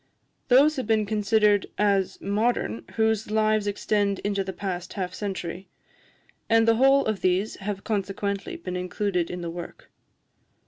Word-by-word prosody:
Those 280 +4 +5
have 255 - -3
been 220 -1 +2
considered 210 -1 +2
as 200 -2 +1
modern 200 - -1
whose 220 -1 +1
lives 215 -1 +2
extend 205 -1 0
into 200 -1 0
the 190 - -5
past 180 -1 -5
half 185 -3 -4
century; 190 -2 -5 0.8
and 225 0 +4
the 225 0 +4
whole 270 +2 +5
of 215 -3 -1
these 185 +3 +1
have 200 0 -5
consequently 200 -1 -2
been 180 -1 -6
included 180 -1 -1
in 180 0 -5
the 170 -1 -4
work. 175 - -9
205 Hz, 145 wpm, -25 LUFS, 190-220 Hz, 0.8 s, Those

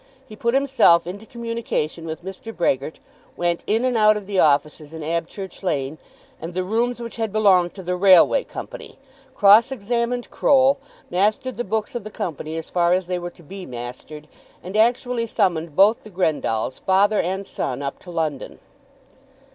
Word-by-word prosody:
He 215 - -12
put 235 +3 0
himself 260 -12 +4
into 200 +5 -8
communication 230 -9 -4
with 160 +2 -6
Mr. 195 +4 -7
Brehgert, 155 -6 -1 0.4
went 175 -1 0
in 225 +4 +1
and 255 -1 +1
out 215 -1 +5
of 205 - -7
the 195 -1 -1
offices 150 +1 +1
in 160 - -7
Abchurch 170 +4 -4
Lane 150 -5 -2 0.4
and 170 +2 -7
the 185 - 0
rooms 235 +5 -1
which 235 -1 -7
had 225 -2 -2
belonged 190 -5 +3
to 190 - -8
the 180 +1 -2
Railway 190 - +5
Company, - - -9 0.4
cross 210 +5 +6
examined 240 +1 -2
Croll, 275 0 +3 0.3
mastered 210 +8 0
the 240 - -1
books 215 0 -2
of 240 - -4
the 215 - -7
Company 160 -5 -5
as 165 - -7
far 175 -1 +2
as 185 0 0
they 180 0 -2
were 175 0 -5
to 175 - -19
be 190 +4 -9
mastered, 125 +5 -8 0.4
and 185 +3 -7
actually 235 +1 +1
summoned 170 -8 0
both 205 +5 +5
the 215 - -13
Grendalls, 150 - -1
father 200 +2 +3
and 190 +3 -2
son, 130 -5 -4
up 140 - -5
to 180 - -14
London. 160 -5 -3
190 Hz, 175 wpm, -22 LUFS, 165-225 Hz, 0.4 s, cross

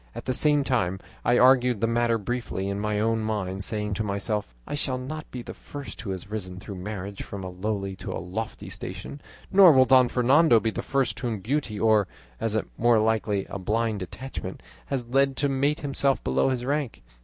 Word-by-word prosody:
At - - -7
the 130 - 0
same 145 +2 +3
time 95 -9 0 0.2
I 120 - +3
argued 125 -3 +5
the 115 - +2
matter 115 0 +2
briefly 110 -3 -3
in 100 0 -2
my 105 0 -1
own 115 +1 +1
mind, 100 -3 -2
saying 105 0 -2
to 110 - -1
myself, 100 - -2
'I - - -6
shall 135 -3 0
not 150 +5 -6
be 125 -1 -6
the - - -8
first 140 -7 -9
who 110 - -6
has 95 -1 -5
risen 95 -3 -5
through 100 -1 -8
marriage 100 +1 -5
from 100 -1 -7
a 95 - -5
lowly 100 +1 -3
to - - -6
a - - -3
lofty 105 +5 -5
station, 95 +10 -7 0.3
nor 190 -3 +9
will 130 -3 +6
Don 130 -1 +6
Fernando 130 +1 +5
be 110 0 -1
the - - -4
first 125 -6 0
whom 120 -3 -2
beauty 115 -1 -2
or, 110 -3 +4 0.3
as 110 -1 -1
is 110 - +1 0.2
more 120 0 +5
likely, 110 -2 +1
a 100 - -6
blind 110 +2 0
attachment, 130 +8 -7 0.2
has 130 -3 -2
led 135 +2 +2
to 145 - +2
mate 140 +3 +1
himself 140 -1 0
below 65 - +2
his 125 -2 -2
rank. 140 -3 -2
115 Hz, 205 wpm, -26 LUFS, 100-130 Hz, 0.3 s, nor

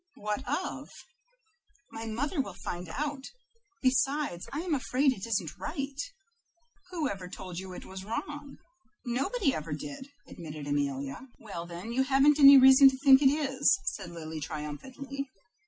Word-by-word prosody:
"What 210 0 -3
of?" - - -3 1.0
"My 225 0 -6
mother 275 +8 -1
will 200 -8 -7
find 175 0 -6
out; 285 - -3 0.6
besides, 265 - +1
I 290 - -3
am 350 -2 -2
afraid 270 0 +2
it 215 -1 -7
isn't 190 -9 -2
right." 275 0 -4 0.9
"Who 335 -5 -1
ever 190 -4 -5
told 180 -2 -7
you 190 -1 -8
it - - -9
was 190 0 -8
wrong?" 280 +7 -6 0.5
"Nobody 275 - 0
ever 155 0 -4
did," 150 - -7 0.2
admitted 155 -3 -8
Amelia. 140 - -2
"Well, 170 -6 -7
then 175 +6 -7
you 260 - +2
haven't 275 +2 +4
any 280 -1 +10
reason 265 +1 +9
to 265 - -5
think 270 0 +7
it 270 - +6
is," 285 +4 +2
said - - -4
Lily, 160 -2 -7
triumphantly. 260 - -6
255 Hz, 150 wpm, -29 LUFS, 175-275 Hz, 1.0 s, any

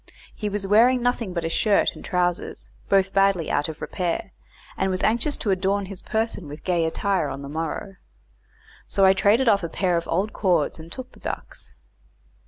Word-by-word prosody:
He 210 - -3
was 205 -1 -2
wearing 240 +5 +4
nothing 245 -5 0
but 170 -2 -3
a - - 0
shirt 205 +4 +2
and - - -11
trousers, 180 -1 -2 0.2
both 195 -1 +3
badly 195 -4 +2
out 145 +2 0
of 160 - -8
repair, 175 -3 -3 0.4
and 190 - 0
was 185 0 -2
anxious 235 +7 +1
to 210 - -1
adorn 195 +1 +1
his 190 -1 -9
person 220 -6 -2
with 145 +2 -9
gay 175 -3 +1
attire 180 0 0
on 135 +1 -6
the - - -6
morrow. 165 +5 -4 0.9
So 195 - +3
I 190 - +7
traded 215 +6 +3
off 200 -3 +4
a 170 - -4
pair 180 0 +1
of 170 - -3
old 195 +6 0
cords 175 -6 +1
and 160 +1 -11
took 255 +3 -7
the - - -18
ducks. - - -7
190 Hz, 190 wpm, -24 LUFS, 170-205 Hz, 0.9 s, I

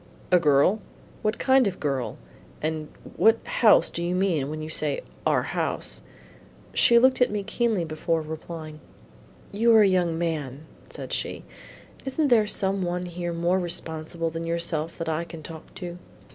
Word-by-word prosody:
"A 180 - +6
girl? 155 +7 +3 0.4
what 215 +1 0
kind 265 -3 +4
of 190 - -2
a - - -20
girl; 135 -4 -2 0.4
and 155 0 -2 0.3
what 225 +1 +5
house 220 -3 +5
do 170 - -3
you 175 +1 -1
mean 175 -7 +1
when 155 +1 -5
you 155 - -5
say 155 -2 -2 0.3
our - - +2
house?" - - -1 0.7
She 235 - +6
looked 260 +2 +4
at 250 - +5
me 210 -1 -2
keenly 215 -3 0
before 160 +1 -1
replying. 155 0 -7 0.7
"You 230 +3 +3
are 220 - +8
a - - +5
young 175 -3 +1
man," 155 -4 -3 0.2
said - - -6
she; - - -3 0.6
"isn't 275 +2 0
there 220 -4 +5
some 195 -1 +1
one 180 0 -2
here 175 0 -4
more 170 +2 +1
responsible 165 -1 -3
than 165 +1 -4
yourself 170 -1 -2
that 165 - -4
I 160 +1 -1
can 165 -2 -10
talk 160 0 -10
to?" 175 -1 -7
170 Hz, 170 wpm, -26 LUFS, 155-195 Hz, 0.7 s, are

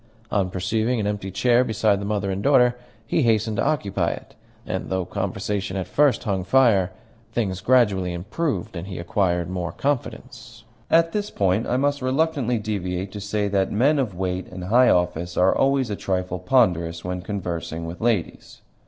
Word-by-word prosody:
On 95 -3 +1
perceiving 110 +6 -1
an 105 - -1
empty 105 -2 -2
chair 120 +6 +3
beside 105 -3 +1
the - - -4
mother 100 -1 -1
and 95 +1 -3
daughter, 125 -1 +4 0.3
he 155 - +1
hastened 110 -3 +1
to - - +1
occupy 100 - 0
it, - - -7 0.3
and - - -4
though 95 -1 -1
conversation 100 +1 -3
at 95 - -2
first 145 -2 +2
hung 95 -5 -1
fire, 100 -4 +3 0.4
things 95 -6 -1
gradually 100 -6 +3
improved, 95 - -3
and 85 +2 -5
he 95 - -6
acquired 85 -1 0
more 90 -2 -3
confidence. 120 -2 -4 0.3
At 165 0 +4
this 210 +1 -2
point 100 +3 0
I 125 - +1
must 145 +1 0
reluctantly 130 -2 +1
deviate 95 -3 -3
to 105 - -7
say 105 0 -1
that 95 -1 +1
men 140 +8 +3
of 115 -9 -1
weight 90 0 -3
and 90 0 -8
high 120 +7 +4
office 90 0 0
are 90 +1 +4
always 135 -4 +2
a - - -1
trifle 90 -2 -2
ponderous 90 -7 +1
when 90 0 -3
conversing 85 -4 -4
with 85 +2 -7
ladies. 110 -7 -2
100 Hz, 175 wpm, -23 LUFS, 90-120 Hz, 0.4 s, daughter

